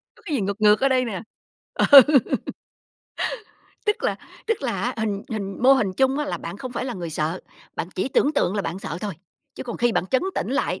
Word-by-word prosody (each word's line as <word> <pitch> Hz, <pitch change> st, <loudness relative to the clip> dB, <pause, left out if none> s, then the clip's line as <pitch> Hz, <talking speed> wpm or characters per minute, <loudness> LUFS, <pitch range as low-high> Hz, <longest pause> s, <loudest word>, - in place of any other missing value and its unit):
Có 460 Hz, -, -21 dB
cái 310 Hz, -, -2 dB
gì 250 Hz, -, 0 dB
ngược 200 Hz, +2 st, -3 dB
ngược 210 Hz, 0 st, +6 dB
ở 275 Hz, -, +4 dB
đây 255 Hz, -1 st, +2 dB
nè. 205 Hz, -6 st, -4 dB, 0.5 s
Ừ. -, -, +3 dB, 2.0 s
Tức 420 Hz, -, 0 dB
là -, -, 0 dB, 0.3 s
tức 450 Hz, -8 st, -1 dB
là 245 Hz, -4 st, -2 dB
á, 250 Hz, +1 st, -1 dB
hình 210 Hz, -3 st, -2 dB
hình 200 Hz, -2 st, -5 dB
mô 260 Hz, +2 st, +7 dB
hình 215 Hz, -8 st, +2 dB
chung 265 Hz, +1 st, +2 dB
á, 295 Hz, -, 0 dB
là -, -, -3 dB
bạn 170 Hz, +3 st, -7 dB
không 255 Hz, +4 st, -7 dB
phải 250 Hz, -, -3 dB
là 250 Hz, -2 st, -4 dB
người 175 Hz, -3 st, -5 dB
sợ, 155 Hz, +3 st, -2 dB, 0.4 s
bạn 170 Hz, -, -3 dB
chỉ 190 Hz, -, -1 dB
tưởng 285 Hz, +2 st, +2 dB
tượng 195 Hz, -, +1 dB
là 205 Hz, -, -1 dB
bạn 175 Hz, +1 st, -4 dB
sợ 170 Hz, -3 st, -5 dB
thôi. 205 Hz, -3 st, -4 dB, 0.4 s
Chứ -, -, -6 dB
còn 240 Hz, -2 st, -6 dB
khi 240 Hz, 0 st, +2 dB
bạn 185 Hz, -, 0 dB
trấn 260 Hz, +6 st, +1 dB
tĩnh -, -, -2 dB
lại -, -, -1 dB
220 Hz, 235 wpm, -23 LUFS, 195-260 Hz, 2.0 s, mô